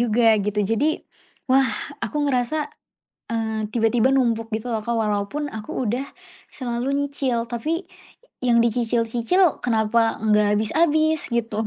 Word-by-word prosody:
juga, 230 -1 +4
gitu. 210 +1 -1
Jadi, 260 +10 +1 0.5
wah, 265 +1 +5 0.4
aku 295 -1 -1
ngerasa, 280 +4 0 0.6
eee, 220 -1 -1
tiba-tiba 235 +2 +3
numpuk 230 -3 +1
gitu 220 +3 -3
loh, 220 -1 -1
Kak. 235 - 0
Walaupun 215 +7 -1
aku 220 +4 -5
udah 250 +5 -2 0.4
selalu 250 +1 -3
nyicil 260 -5 -2
tapi 310 +9 -2 0.6
yang 240 -2 +3
dicicil-cicil 235 - +1
kenapa 225 -1 +2
nggak 210 -1 +3
habis-habis, 315 +6 +2
gitu. 225 -2 -1
235 Hz, 125 wpm, -23 LUFS, 220-270 Hz, 0.6 s, wah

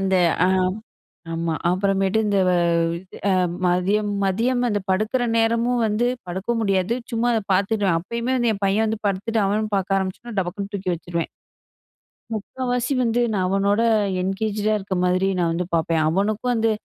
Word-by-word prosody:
அந்த 190 0 +1 0.3
ஆ - - +2 0.9
ஆமா. 165 0 -1 0.2
அப்புறமேட்டு 195 +2 +1
இந்த 200 -1 +1
அது 170 +2 0 0.3
மதியம், 200 +4 +1
மதியம் 240 +6 +1
அந்த 205 -2 0
படுக்கிற 215 +6 0
நேரமும் 230 +1 +2
வந்து 215 +3 +1 0.2
படுக்க 190 +6 -3
முடியாது. 195 +1 +1 0.2
சும்மா 235 +1 +1
அத 225 - +1
பாத்துடுவேன். 200 -2 +1
அப்பயுமே 235 +7 -3
வந்து 240 -2 +2
என் 200 - -6
பையன் 205 +3 +2
வந்து 220 0 -2
படுத்துட்டு 210 +3 -1
அவனும் 210 +1 -1
பாக்க 195 +1 0
ஆரம்பிச்சனா, 190 +5 -5
டபக்குன்னு 195 +2 -4
தூக்கி 185 -2 -2
வச்சுடுவேன். 170 0 -4 1.0
முக்காவாசி 245 +4 -2
வந்து 235 0 +1
நான் 190 -3 0
அவனோட 200 +3 +2 0.4
என்கேஜ் 200 +3 -2
டா 215 - +3
இருக்கிற 190 -2 -4
மாதிரி 185 +1 +2
நான் 170 -2 +1
வந்து 180 +2 -1
பாப்பேன். 165 -1 +1
"அவனுக்கும் 210 +7 0
வந்து 225 -1 +2
200 Hz, 150 wpm, -22 LUFS, 185-225 Hz, 1.0 s, டா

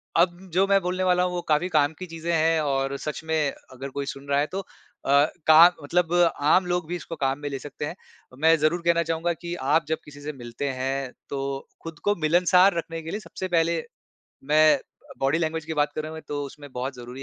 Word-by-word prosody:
अब 175 +1 +3 0.2
जो 190 +2 +4
मैं 195 0 +4
बोलने 180 +1 -1
वाला 180 -1 +3
हूँ, 180 - -1
वो 175 - -2
काफ़ी 160 +3 +1
काम 150 -2 +2
की 185 - -5
चीज़ें 165 0 -4
हैं 165 0 +3
और 135 -1 0
सच 150 +2 -5
में 160 -3 0 0.2
अगर 130 +2 -7
कोई 140 +1 -4
सुन 140 0 -7
रहा 140 - +3
है, 145 - +1
तो 190 - -4 0.5
अ, 140 +1 +5 0.2
काम 160 +3 +9
मतलब 170 +3 0 0.3
आम 165 +6 +4
लोग 175 -2 -1
भी 175 - -3
इसको 170 -1 -6
काम 135 -2 -1
में 145 0 -4
ले 135 - -4
सकते 145 +1 -6
हैं। 160 - -5 0.4
अ, - - -12
मैं 160 +2 +5
ज़रूर 155 +4 +1
कहना 170 0 +3
चाहूँगा 165 +1 -1
कि 170 +1 -7
आप 150 +4 +1
जब 160 - 0
किसी 145 -1 -12
से 150 +1 -4
मिलते 120 +2 -5
हैं, 135 0 -2 0.2
तो 135 -1 -4 0.2
खुद 165 -2 -8
को 205 0 +2
मिलनसार 180 +4 +5
रखने 165 0 -4
के 160 +1 -7
लिए 210 - -3
सबसे 190 -3 -6
पहले 165 0 +1 0.6
मैं 155 +1 +5
अ, - - -17 0.4
बॉडी 135 +4 +1
लैंग्वेज 160 -1 -2
की 160 0 -4
बात 150 0 +1
करूँ 155 +1 -4
मैं, 160 - -8
तो 145 -1 -4
उसमें 145 +1 -11
बहुत 130 +2 -4
ज़रूरी 125 +2 -9
155 Hz, 230 wpm, -25 LUFS, 140-170 Hz, 0.6 s, काम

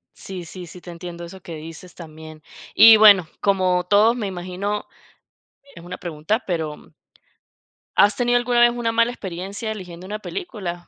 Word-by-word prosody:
Sí, 185 -3 -8
sí, 180 +1 -10
sí 180 - -12
te 175 - -11
entiendo 170 0 -9
eso 185 +2 -12
que 170 -2 -9
dices 165 +3 -11
también. 155 -2 -12 0.3
Y, 225 +1 +9
bueno, 205 -5 +7
como 185 -2 +1
todo 210 +4 +4
me 235 -4 -4
imagino, 185 +3 -4 0.9
es 170 - -12
una 180 +1 -8
pregunta, 175 +7 -3
pero 160 -4 -4 1.0
¿has 205 0 +5
tenido 245 -1 +2
alguna 240 0 +1
vez 240 - +6
una 240 -1 -2
mala 230 +1 +2
experiencia 195 +1 -6
eligiendo 180 -4 -9
una 210 +2 -4
película? 195 - -6
185 Hz, 160 wpm, -21 LUFS, 175-215 Hz, 1.0 s, Y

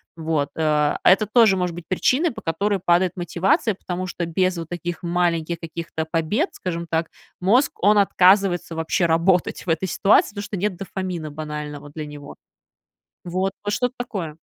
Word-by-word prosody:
Вот, 160 -3 -1
а, 150 -2 +2
а - - +7
это 205 +3 +3
тоже 215 -3 +5
может 180 -2 -2
быть 175 -1 -9
причиной, 265 - +2
по - - -9
которой 200 +5 -1
падает 175 +1 +2
мотивация, 180 +4 +1
потому 185 0 -5
что 175 -1 -3
без 185 +2 0
вот 165 -1 -6
таких 175 0 -5
маленьких 170 -1 0
каких-то 165 -1 -5
побед, 165 - 0
скажем 170 -2 -4
так, 165 0 -1 0.3
мозг, 235 +10 +3
он 210 +1 +5
отказывается 190 -3 +3
вообще 160 +2 0
работать 170 +2 +1
в 180 - -6
этой 165 +4 0
ситуации, 200 +4 +4
потому 205 0 -6
что 205 -1 -5
нет 200 +1 -1
дофамина 185 -4 -5
банального 150 -1 -6
для 155 0 -6
него. 145 -1 -10 0.9
Вот, 185 +2 -1
вот 205 0 -2
что-то 250 0 -1
такое. 180 -10 -5
175 Hz, 170 wpm, -22 LUFS, 160-195 Hz, 0.9 s, а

